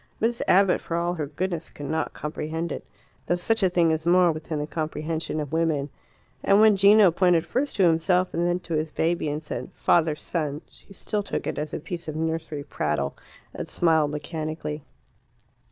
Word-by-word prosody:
Miss 235 +1 0
Abbott, 195 0 +4
for 165 - -3
all 175 +1 0
her 155 -4 -3
goodness, 170 +2 -3
could 145 - -9
not 160 +3 -1
comprehend 160 +2 -4
it, - - -5 0.4
though 175 - +2
such 220 +6 0
a 190 - +4
thing 170 -2 +3
is 160 +1 -2
more 180 0 +5
within 155 0 -5
the 150 - -2
comprehension 155 0 -3
of 150 0 -5
women. 155 -4 0 0.5
And 200 +1 +5
when 215 -1 +6
Gino 200 -1 +6
pointed 175 -1 +3
first 280 +3 -1
to 195 - +3
himself 180 +2 +3
and 170 +1 +1
then 175 +1 0
to 175 - -6
his 155 0 0
baby 165 0 0
and 150 +2 -3
said - - -5
"father 160 -3 +3
son," 150 -1 -3
she - - -20
still 205 +2 -3
took 205 - -4
it - - -3
as 150 0 -4
a - - -3
piece 170 +2 -7
of 155 - -4
nursery 160 -2 -3
prattle, 75 - -2 0.4
and - - -6
smiled 160 -3 +2
mechanically. 155 0 -4
165 Hz, 190 wpm, -25 LUFS, 155-180 Hz, 0.5 s, when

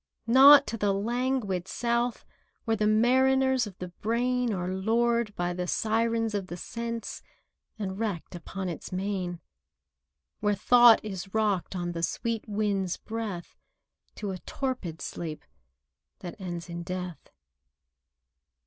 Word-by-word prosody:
Not 275 +4 +9
to 230 - -4
the 205 -2 +1
languid 225 -4 -1
South, 235 +2 -1 0.4
Where 225 -2 +2
the 210 0 +1
mariners 260 +2 +3
of 190 -3 -11
the 180 - -6
brain 240 +5 0
Are 180 -3 -2
lured 230 +2 +1
by 175 0 -1
the 180 0 -3
Sirens 225 +2 +1
of 200 -2 -2
the 175 - -6
Sense, 230 +4 -5 0.6
And 195 -2 -4
wrecked 205 -8 -3
upon 185 +2 -5
its 170 - -6
main— 185 -2 -3 1.0
Where 205 0 +1
Thought 240 +2 +6
is 195 -1 -6
rocked, 205 -4 0
on 175 -1 -2
the 170 -1 -4
sweet 225 +7 -2
wind's 200 -3 0
breath 215 -6 -5 0.6
To 205 -2 -4
a 185 - -5
torpid 245 - -4
sleep 160 -3 -6 0.8
that 175 -2 -6
ends 175 -2 -5
in 170 0 -5
death. 180 -1 -6
210 Hz, 130 wpm, -28 LUFS, 180-235 Hz, 1.0 s, Not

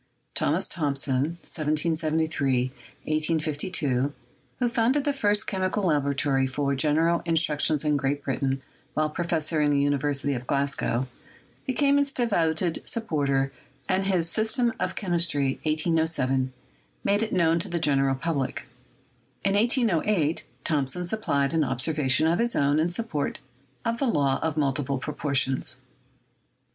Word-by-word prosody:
Thomas - - 0
Thomson 140 0 -1
(1773 155 -4 0 0.3
1852), 155 -3 0 0.5
who 250 - +1
founded 240 +4 +2
the 285 - 0
first 210 -5 +2
chemical 190 +1 -1
laboratory 140 -4 +1
for 140 +1 -1
general 160 +4 +2
in 165 -1 0
struction 155 -1 +3
in 150 -1 +2
Great 140 +1 -1
Britain 135 0 -1 0.3
while 155 0 +1
professor 160 -2 -1
in 150 - +3
the 140 -1 +2
Univer 145 0 +1
sity 140 0 -1
of 125 0 -6
Glasgow, 140 -3 0 0.6
became 280 +2 +3
its 285 -1 0
devoted 170 - 0
supporter, 140 -11 0 0.4
and 190 +1 +1
his 180 -4 +2
"System 225 +5 +2
of - - -2
Chemistry" 170 -8 +1
(1807) 155 -5 +1 0.5
made 200 +1 +2
it 225 - -2
known 165 -1 +3
to - - 0
the 175 - -1
general 135 -4 +2
public. 140 -2 -2 0.8
In 195 - +2
1808, 205 - +1 0.2
Thomson 155 +3 0
supplied 155 -8 0
an 160 -1 +2
observation 130 +1 +1
of 165 +3 +2
his 235 0 +1
own 145 +2 +2
in 165 +2 +2
support 175 -6 -2 0.5
of 230 0 -1
the 275 - +1
law 140 - +1
of 160 -1 -2
multiple 140 -1 0
proportions. 135 -2 -1
155 Hz, 130 wpm, -26 LUFS, 140-175 Hz, 0.8 s, struction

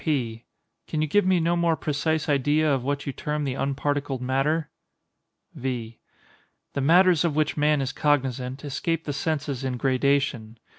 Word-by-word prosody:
P. 120 -7 -2 0.4
Can 155 -1 -1
you - - 0
give 205 +5 +2
me 185 -1 +4
no 170 +1 +1
more 170 -1 +2
precise 155 +2 -1
idea 145 +1 +2
of 130 -3 -1
what 140 +1 -2
you 140 - -3
term 150 +3 -3
the 135 -2 -1
unparticled 140 0 -1
matter? 135 +5 0 0.8
V. 120 -3 -4 0.7
The 140 - -1
matters 175 +3 +5
of 165 -4 0
which 155 -1 +1
man 150 -1 +2
is 135 0 -2
cognizant 135 -2 0
escape 160 +4 -2
the 145 - -3
senses 140 -3 -2
in 130 -2 -2
gradation. 130 -3 0
145 Hz, 160 wpm, -25 LUFS, 130-155 Hz, 0.8 s, matters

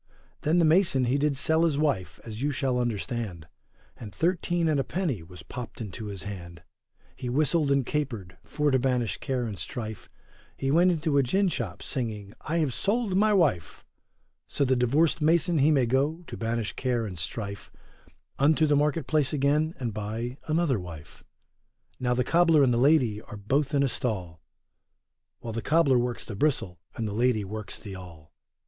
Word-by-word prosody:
Then 160 +4 +2
the 170 - +5
mason 160 -5 +4
he 130 +4 +1
did 145 0 +1
sell 160 +4 +2
his 160 -4 +2
wife, 95 - -1
as 110 0 -7
you 145 - +1
shall 130 -3 0
understand, 110 -6 -3 0.5
And 110 -4 -9
thirteen 175 0 0
and 155 -3 +2
a - - +1
penny 155 - -2
was 90 +2 -12
popt 120 -2 -8
into 110 0 -6
his 100 -2 -6
hand; 85 -5 -8 0.5
he 125 - -5
whistled 150 +3 +2
and 140 -2 +2
capered, 115 -12 -3
for 150 -1 0
to 130 - +3
banish 125 -3 0
care 130 -3 -2
and 105 -4 -5
strife, 110 -5 -5 0.5
He 135 0 -1
went 175 +4 +5
into 155 -4 +1
a - - +6
gin 190 +10 +2
shop, 120 - -4
singing, 105 -6 -4
I 165 - -2
have 150 -6 +1
sold 205 - 0
my 215 +2 +4
wife; 160 - +1 0.6
So 140 - 0
the 130 0 +3
divorced 140 +7 +2
mason 165 +1 +3
he 140 +3 +5
may 140 -5 +4
go, 140 +8 0
to - - -7
banish 115 -1 -2
care 125 -3 -1
and 95 -4 -6
strife, 100 +3 -5 0.7
Unto 155 +3 +4
the 150 -1 +3
market 150 +1 +1
place 150 -3 +1
again 150 +3 +1
and 120 -5 -3
buy 110 +5 -4
another 155 -6 +1
wife. 85 -5 -10 0.8
Now 125 -1 +1
the 125 - +2
cobler 165 -2 +4
and 125 -2 +3
the 120 - +1
lady 125 -6 +3
are 110 -1 -10
both 135 +8 0
in 140 - +3
a - - +3
stall, 95 - -3 1.0
While 115 - -5
the 115 - -3
cobler 145 -2 +3
works 120 0 -2
the 110 - -6
bristle, 100 - 0 0.2
and 110 - -2
the 100 - -4
lady 120 -1 +2
works 105 +2 -6
the 100 -3 -8
awl. 85 -5 -12
130 Hz, 185 wpm, -27 LUFS, 110-150 Hz, 1.0 s, a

